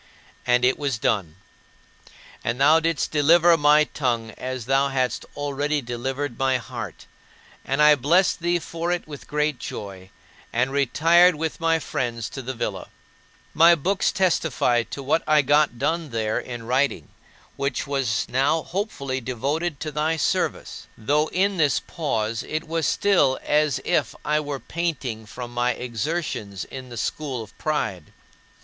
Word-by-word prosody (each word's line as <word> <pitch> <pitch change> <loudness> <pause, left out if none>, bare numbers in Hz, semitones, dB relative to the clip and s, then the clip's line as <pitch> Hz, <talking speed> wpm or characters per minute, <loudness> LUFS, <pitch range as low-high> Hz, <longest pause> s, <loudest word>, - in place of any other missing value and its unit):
And 125 0 +4
it 130 - +2
was 140 -5 -1
done. 95 -8 -1 1.1
And 120 +2 -2
thou 150 +4 +6
didst 165 -2 -1
deliver 165 +3 +5
my 150 -1 +5
tongue 120 -7 -2
as 130 0 -5
thou 135 +2 +2
hadst 130 -2 -1
already 145 +1 -1
delivered 130 +1 -4
my 135 -1 +2
heart; 120 - -8 0.6
and 135 +3 +1
I 150 0 +8
blessed 165 +9 +2
thee 175 0 +1
for 170 +1 -4
it 175 -2 -2
with 145 -3 -10
great 150 -2 0
joy, 95 -2 -7 0.4
and 125 +3 0
retired 165 +6 +4
with 160 +1 -3
my 165 0 +2
friends 120 -7 -3
to 135 - -7
the 130 +1 -5
villa. - - -4 0.7
My 170 +2 +7
books 190 +6 0
testify 160 -10 +1
to 140 - -6
what 145 +5 +2
I 150 -1 +5
got 145 -2 +3
done 165 +5 -1
there 110 -2 -1
in 120 -2 -7
writing, 130 +4 0 0.5
which 140 -2 -2
was 135 -6 -1
now 140 +5 +1
hopefully 140 -9 -3
devoted 140 +6 -2
to 155 - -3
thy 155 +2 0
service; 150 - -2
though 145 +7 +1
in 195 +3 0
this 150 -4 +3
pause 115 -8 -2
it 155 +1 -4
was 165 -1 -1
still 180 -10 +3
as 150 -2 +2
if - - 0
I 150 0 +2
were 145 -2 -4
panting 135 -11 -4
from 120 +2 -8
my 120 +1 +1
exertions 120 - -4
in 130 -1 -9
the 120 - -8
school 135 -5 -3
of 105 - -16
pride. 105 - -2
140 Hz, 155 wpm, -24 LUFS, 125-160 Hz, 1.1 s, I